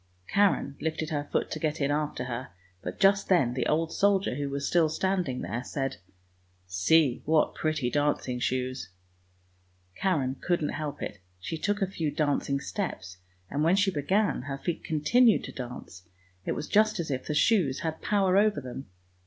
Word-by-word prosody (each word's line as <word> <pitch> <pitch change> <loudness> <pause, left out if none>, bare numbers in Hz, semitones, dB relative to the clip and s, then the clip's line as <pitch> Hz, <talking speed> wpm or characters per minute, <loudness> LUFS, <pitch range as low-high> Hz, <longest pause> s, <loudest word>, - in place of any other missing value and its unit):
Karen 200 -8 +2
lifted 160 0 -2
her 145 -1 -2
foot - - 0
to 155 - -3
get 155 0 -1
in 140 0 +1
after 150 -3 -1
her, 125 0 -5 0.3
but - - -6
just 195 0 +4
then 150 -10 +3
the 125 -1 -1
old 160 +1 +1
soldier, 200 -4 +2
who 140 +2 -3
was 140 0 -2
still 165 -3 +3
standing 180 -5 -1
there, 115 +8 -3
said, 135 -1 -3 0.4
" 90 - -38 0.2
See 120 - +3
what 155 0 +2
pretty 155 -6 -1
dancing 145 -4 0
shoes! 130 -3 -2 0.5
" 90 0 -38
Karen 140 -9 +1
couldn't 170 -4 0
help 150 -1 -4
it; 105 - -5 0.2
she 90 - -4
took 205 +5 0
a - - +1
few 165 -5 -2
dancing 145 -2 0
steps, 115 - -4 0.3
and 145 +7 -1
when 170 +4 +4
she 195 0 +3
began 190 +7 +1
her 135 +1 -5
feet 170 +4 -3
continued 220 +10 +3
to - - -6
dance; 125 -7 -8 0.4
it - - 0
was 150 - -4
just 215 -1 +3
as 160 -3 -2
if 130 -1 -3
the 150 - -1
shoes 155 - +3
had 160 -1 -1
a - - -18
power 195 -2 +2
over 210 -2 +3
them. 130 0 -7
150 Hz, 185 wpm, -28 LUFS, 130-180 Hz, 0.5 s, just